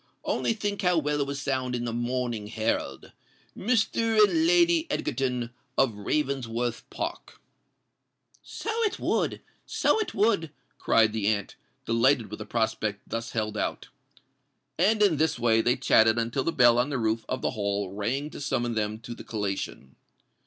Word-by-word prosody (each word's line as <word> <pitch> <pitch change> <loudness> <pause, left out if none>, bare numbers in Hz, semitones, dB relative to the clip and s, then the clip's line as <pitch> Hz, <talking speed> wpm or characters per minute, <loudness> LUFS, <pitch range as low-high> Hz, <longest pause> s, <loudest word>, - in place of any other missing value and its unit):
Only - - 0
think 205 -2 -3
how 180 -2 +3
well 150 -1 0
it 140 - -1
will 140 - -3
sound 130 -3 -2
in 120 0 -3
the 115 - -3
Morning 120 -2 -2
Herald—'Mr. 220 - 0
and 325 +7 +2
Lady 340 -2 +4
Egerton, 125 - -2 0.3
of 135 -4 +3
Ravensworth 120 0 -2
Park.'" - - -6 1.0
"So 445 - -5
it 430 0 -1
would—so - - -1
it 435 - -3
would!" 200 -6 +2 0.3
cried 110 -1 +3
the 110 -2 -1
aunt, 105 -2 -1 0.3
delighted 115 -1 +2
with 105 - -6
the - - -7
prospect 110 -3 -2
thus 115 0 -4
held 110 -1 -2
out. - - -3 0.9
And 210 +4 +4
in 180 -7 +4
this 160 +1 +1
way 115 -1 +3
they 120 +2 +2
chatted 115 -3 +4
until 120 +3 -1
the 165 - +1
bell 120 -5 +5
on 125 +4 +1
the 140 - -1
roof 110 -1 0
of 130 - -3
the - - +1
Hall 100 -4 -2
rang 125 +9 -2
to - - -8
summon 120 -3 -1
them 110 -1 -1
to 120 - -7
the - - -10
collation. 100 - -4
120 Hz, 160 wpm, -27 LUFS, 110-160 Hz, 1.0 s, bell